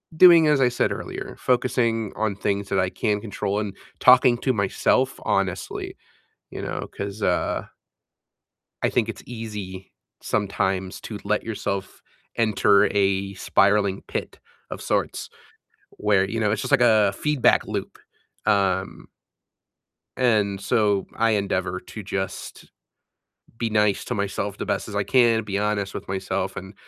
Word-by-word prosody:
doing 170 Hz, -1 st, +8 dB
as 150 Hz, -2 st, +3 dB
I 125 Hz, -, +5 dB
said 120 Hz, -, 0 dB
earlier, -, -, -7 dB
focusing 115 Hz, -3 st, 0 dB
on 110 Hz, -2 st, -1 dB
things 100 Hz, 0 st, -2 dB
that 95 Hz, -, +1 dB
I 95 Hz, 0 st, +1 dB
can 105 Hz, +2 st, -1 dB
control 100 Hz, -1 st, -3 dB
and 105 Hz, -2 st, -4 dB, 0.2 s
talking 125 Hz, -1 st, +6 dB
to 130 Hz, -, +1 dB
myself 115 Hz, +5 st, +1 dB
honestly, 95 Hz, -3 st, -2 dB, 0.5 s
you -, -, -7 dB
know? -, -, -4 dB
'Cause, 100 Hz, +1 st, -6 dB
uh 90 Hz, -2 st, 0 dB, 1.2 s
I -, -, +3 dB
think 115 Hz, -2 st, 0 dB
it's 115 Hz, -, -7 dB
easy 105 Hz, -5 st, -7 dB, 0.3 s
sometimes 95 Hz, -2 st, -1 dB
to -, -, -7 dB
let -, -, 0 dB
yourself 100 Hz, 0 st, -4 dB, 0.3 s
enter 105 Hz, -2 st, +4 dB
a 100 Hz, -1 st, +1 dB
spiraling 100 Hz, -1 st, +2 dB
pit -, -, -5 dB, 0.3 s
of -, -, -6 dB
sorts -, -, -2 dB, 0.6 s
where, 100 Hz, -2 st, +1 dB
you 115 Hz, +3 st, -2 dB
know, 105 Hz, -1 st, +2 dB
it's 105 Hz, 0 st, 0 dB
just -, -, -4 dB
like -, -, +5 dB
a 110 Hz, -4 st, +5 dB
feedback 150 Hz, +5 st, +2 dB
loop. -, -, -5 dB, 0.5 s
Um 95 Hz, -1 st, 0 dB, 1.1 s
and 105 Hz, -6 st, +2 dB
so 100 Hz, 0 st, +1 dB
I 115 Hz, 0 st, +2 dB
endeavor 95 Hz, -3 st, -1 dB
to 110 Hz, -, -10 dB
just 95 Hz, 0 st, -5 dB, 0.9 s
be 115 Hz, -1 st, -1 dB
nice 105 Hz, -2 st, +2 dB
to -, -, -3 dB
myself 100 Hz, 0 st, -3 dB
the -, -, -4 dB
best -, -, -2 dB
as 105 Hz, -, -7 dB
I 100 Hz, -, +1 dB
can, 115 Hz, -2 st, +3 dB
be 100 Hz, -1 st, -3 dB
honest 105 Hz, -1 st, -1 dB
with -, -, -7 dB
myself 95 Hz, 0 st, -2 dB
and 95 Hz, +1 st, -8 dB
100 Hz, 145 wpm, -24 LUFS, 95-115 Hz, 1.2 s, doing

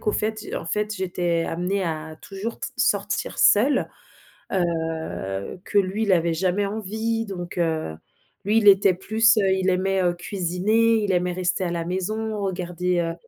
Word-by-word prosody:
qu'au 210 Hz, -, 0 dB
fait 220 Hz, +1 st, -1 dB, 0.2 s
en -, -, -5 dB
fait 210 Hz, +4 st, -1 dB
j'étais 175 Hz, -3 st, -1 dB
amenée 180 Hz, +4 st, -1 dB
à 160 Hz, -1 st, -4 dB
toujours 200 Hz, +4 st, -6 dB
t -, -, -3 dB
sortir 205 Hz, -4 st, 0 dB
seule. 255 Hz, +7 st, +4 dB, 0.6 s
Heu, 160 Hz, -, -2 dB
que -, -, +1 dB
lui, 195 Hz, +2 st, 0 dB
il 205 Hz, -, +2 dB
avait 170 Hz, -2 st, +2 dB
jamais 185 Hz, +4 st, 0 dB
envie 220 Hz, +2 st, -2 dB
donc, 175 Hz, -3 st, -6 dB
heu, 160 Hz, -, -1 dB, 0.5 s
lui 210 Hz, +3 st, +3 dB
il 210 Hz, -2 st, +5 dB
était 195 Hz, -1 st, +6 dB
plus, 220 Hz, +5 st, +3 dB
heu, 195 Hz, -2 st, +3 dB
il 190 Hz, 0 st, +1 dB
aimait, 190 Hz, +1 st, +1 dB
heu, 175 Hz, -1 st, +2 dB
cuisiner, 200 Hz, +5 st, +1 dB
il 200 Hz, -2 st, 0 dB
aimait 180 Hz, 0 st, +1 dB
rester 180 Hz, +1 st, -1 dB
à 175 Hz, -, -1 dB
la 170 Hz, -1 st, -2 dB
maison, 215 Hz, +4 st, -2 dB
regarder, 180 Hz, -1 st, -1 dB
heu, 165 Hz, -1 st, -2 dB
190 Hz, 165 wpm, -24 LUFS, 175-210 Hz, 0.6 s, était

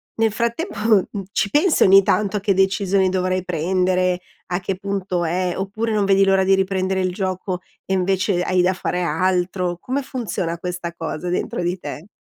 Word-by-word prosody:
nel 225 Hz, -1 st, +2 dB
frattempo, 235 Hz, -, -2 dB
mhmm, 210 Hz, -3 st, +3 dB, 0.3 s
ci 200 Hz, -, 0 dB
pensi 310 Hz, -, +2 dB
ogni 195 Hz, +1 st, +7 dB
tanto 210 Hz, +1 st, +1 dB
a -, -, -1 dB
che 200 Hz, 0 st, +2 dB
decisioni 195 Hz, 0 st, +2 dB
dovrai 185 Hz, 0 st, 0 dB
prendere, 180 Hz, +1 st, +1 dB, 0.3 s
a 175 Hz, -, +1 dB
che 190 Hz, +1 st, -3 dB
punto 190 Hz, -3 st, -2 dB
è, 180 Hz, +2 st, 0 dB
oppure 210 Hz, +4 st, -2 dB
non 205 Hz, -2 st, +2 dB
vedi 195 Hz, 0 st, +4 dB
l'ora 195 Hz, 0 st, +3 dB
di 195 Hz, -, +3 dB
riprendere 190 Hz, 0 st, 0 dB
il 185 Hz, -1 st, 0 dB
gioco 185 Hz, -1 st, -3 dB, 0.2 s
e 190 Hz, -, -2 dB
invece 190 Hz, 0 st, +1 dB
hai 185 Hz, -1 st, +2 dB
da 185 Hz, +1 st, +2 dB
fare 180 Hz, 0 st, -2 dB
altro? 180 Hz, +1 st, 0 dB
Come 260 Hz, +8 st, -2 dB
funziona 200 Hz, -10 st, -3 dB
questa 175 Hz, -1 st, -4 dB
cosa 165 Hz, +1 st, -4 dB
dentro 175 Hz, 0 st, -2 dB
di 175 Hz, +2 st, -1 dB
te? 165 Hz, 0 st, -7 dB
190 Hz, 180 wpm, -21 LUFS, 180-195 Hz, 0.3 s, ogni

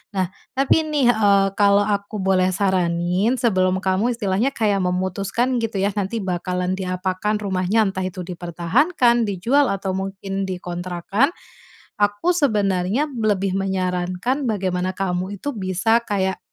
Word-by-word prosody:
Nah, 185 Hz, -2 st, +1 dB, 0.3 s
tapi 275 Hz, +4 st, +3 dB
nih, 295 Hz, -5 st, +2 dB
eee, 200 Hz, -3 st, +3 dB
kalau 200 Hz, 0 st, +4 dB
aku 205 Hz, 0 st, -2 dB
boleh 185 Hz, -1 st, +2 dB
saranin, 185 Hz, +3 st, +1 dB
sebelum 185 Hz, -6 st, +2 dB
kamu 190 Hz, +6 st, +1 dB
istilahnya 215 Hz, +3 st, 0 dB
kayak 210 Hz, -3 st, +1 dB
memutuskan 190 Hz, +7 st, -1 dB
gitu 225 Hz, -2 st, -3 dB
ya 200 Hz, +2 st, +1 dB
nanti 205 Hz, +2 st, -2 dB
bakalan 180 Hz, 0 st, -2 dB
diapakan 185 Hz, +2 st, -2 dB
rumahnya, 195 Hz, +2 st, +1 dB
entah 190 Hz, -1 st, -3 dB
itu 185 Hz, 0 st, -4 dB
dipertahankan, 230 Hz, -, +1 dB
dijual, 235 Hz, +9 st, +2 dB
atau 195 Hz, -1 st, -2 dB
mungkin 195 Hz, 0 st, -4 dB
dikontrakkan, 180 Hz, -, -1 dB, 0.7 s
aku 205 Hz, +11 st, +2 dB
sebenarnya 210 Hz, -, +1 dB
lebih 210 Hz, -6 st, 0 dB
menyarankan 185 Hz, +7 st, -1 dB
bagaimana 185 Hz, -3 st, -1 dB
kamu 185 Hz, +1 st, -2 dB
itu 285 Hz, +9 st, -4 dB
bisa 190 Hz, -2 st, -1 dB
kayak, 190 Hz, -2 st, -1 dB
195 Hz, 125 wpm, -21 LUFS, 185-215 Hz, 0.7 s, kalau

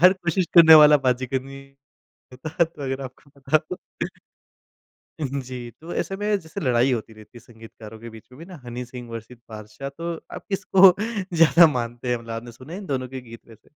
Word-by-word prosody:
हर 180 Hz, +2 st, +7 dB
कोशिश 180 Hz, -1 st, -1 dB
करने 160 Hz, -2 st, +9 dB
वाला 150 Hz, 0 st, +7 dB
बाजीगर 130 Hz, +1 st, 0 dB
नहीं 135 Hz, 0 st, -11 dB, 0.7 s
होता, 155 Hz, +6 st, -1 dB
तो 160 Hz, -3 st, -9 dB
अगर 135 Hz, 0 st, -3 dB
आपको 130 Hz, +2 st, -12 dB
पता 135 Hz, +3 st, +2 dB
हो। 180 Hz, -, -4 dB, 1.4 s
उ -, -, -2 dB
हुँ, 140 Hz, +1 st, -3 dB
जी। 125 Hz, -2 st, -8 dB
तो 170 Hz, +2 st, -9 dB
ऐसे 195 Hz, -, -4 dB
में 205 Hz, -, -6 dB, 0.2 s
जैसे 160 Hz, -1 st, -8 dB
लड़ाई 125 Hz, -1 st, +2 dB
होती 115 Hz, -1 st, -4 dB
रहती 110 Hz, -1 st, -16 dB
है, -, -, -17 dB
संगीतकारों 110 Hz, -1 st, -13 dB
के 115 Hz, 0 st, -9 dB
बीच 110 Hz, -1 st, -14 dB
में 130 Hz, -, -15 dB
भी 165 Hz, -, -10 dB
ना 185 Hz, -2 st, -11 dB
हनी 120 Hz, +1 st, -6 dB
सिंह 125 Hz, -2 st, -9 dB
वर्सेस 115 Hz, +1 st, -9 dB
बादशाह, 110 Hz, +5 st, -8 dB
तो 165 Hz, +5 st, -6 dB, 0.2 s
आप -, -, -8 dB
किसको 195 Hz, -1 st, +1 dB, 0.5 s
ज़्यादा 165 Hz, +1 st, +7 dB
मानते 120 Hz, 0 st, -4 dB
हैं 120 Hz, -, +1 dB
मतलब 115 Hz, 0 st, -12 dB
आपने 115 Hz, +1 st, -7 dB
सुने 130 Hz, +5 st, -12 dB
है -, -, -6 dB
इन 195 Hz, -, -10 dB
दोनों 130 Hz, -4 st, -3 dB
के -, -, -5 dB
गीत 115 Hz, -, -11 dB
वैसे? 110 Hz, -1 st, -18 dB
130 Hz, 210 wpm, -23 LUFS, 120-160 Hz, 1.4 s, करने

